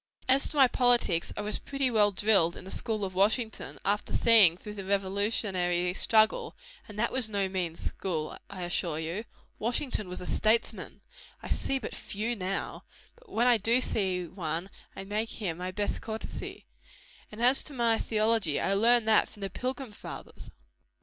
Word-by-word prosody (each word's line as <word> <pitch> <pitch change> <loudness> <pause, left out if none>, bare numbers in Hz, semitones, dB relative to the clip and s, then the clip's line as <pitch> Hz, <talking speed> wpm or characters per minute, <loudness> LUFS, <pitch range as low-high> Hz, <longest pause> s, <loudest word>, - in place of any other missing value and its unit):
As 265 +1 +4
to 300 - -7
my 270 -2 +7
politics, 240 -9 +2
I - - -1
was 210 +1 -3
pretty 275 -2 -1
well 210 -2 +4
drilled 195 -4 +3
in - - -11
the 190 - -7
school 215 -4 -2
of 185 - -6
Washington, 220 +4 0
after 205 +1 0
seeing 210 -8 +6
through 210 +2 -9
the 200 -2 -7
revolutionary 190 -2 0
struggle; 220 +3 +2 0.3
and 210 - -11
that 235 +2 +1
was 255 -4 0
no 200 -2 0
mean 180 -3 -3
school, 160 -3 -3
I 185 -2 -6
assure 175 -2 -1
you. 165 +8 -4 0.3
Washington 235 -3 -1
was 180 - -5
a 180 - -7
statesman! 220 +2 0 0.4
I - - -7
see 270 - 0
but 250 - -6
few 220 +4 -3
now; 195 -1 -4 0.3
but 480 -2 -22
when 235 -8 +1
I 245 -2 +5
do 230 +4 +3
see 190 -7 0
one, 170 +1 -4 0.2
I 195 - -6
make 210 +3 -3
him 180 -6 -4
my 180 +1 -3
best 205 +2 -2
courtesy. 220 0 -7 0.7
And 210 - -10
as 250 +3 +5
to - - -4
my 235 -3 +2
theology, 215 -7 +1
I 195 - +1
learned 230 +3 +4
that 220 - +4
from 205 - -15
the 195 -2 -4
pilgrim 255 +1 -4
fathers." 205 - -10
210 Hz, 175 wpm, -29 LUFS, 185-230 Hz, 0.7 s, my